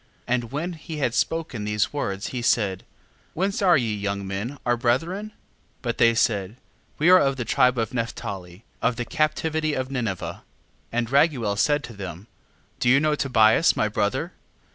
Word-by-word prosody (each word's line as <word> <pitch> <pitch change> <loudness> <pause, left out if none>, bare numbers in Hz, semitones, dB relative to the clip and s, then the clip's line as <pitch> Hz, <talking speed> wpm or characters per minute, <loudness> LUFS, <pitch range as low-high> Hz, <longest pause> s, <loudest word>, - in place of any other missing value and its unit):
7:3. 125 - +1
And 120 -2 -1
when 165 +6 -3
he 160 -1 -8
had 130 -5 0
spoken 160 -7 -1
these 105 +3 0
words, 100 -8 -3
he 125 - -4
said: 105 -6 +1 0.5
Whence 195 +4 -1
are 180 -5 +5
ye 115 -5 0
young 100 -1 -3
men 100 +8 -4
our 120 -1 +3
brethren? 165 - 0
7:4. - - -28 0.5
But 120 -2 -2
they 115 0 +5
said: 105 -3 +1 0.4
We 165 +4 +4
are 185 - +9
of 135 -3 +2
the 125 -3 -4
tribe 125 +3 +3
of 115 -2 -1
Nephtali, 100 -5 -5 0.2
of 125 - +1
the 120 0 -3
captivity 155 +1 0
of 130 0 -3
Ninive. 115 -8 -2
7:5. - - -6 0.5
And 115 -1 -1
Raguel 135 -8 +3
said 145 +8 +2
to 120 - -8
them: 95 -2 -7 0.5
Do 120 - +2
you 135 +2 +6
know 155 +1 +2
Tobias 125 0 +4
my 110 - +2
brother? 105 -1 -1
120 Hz, 185 wpm, -24 LUFS, 105-150 Hz, 0.5 s, are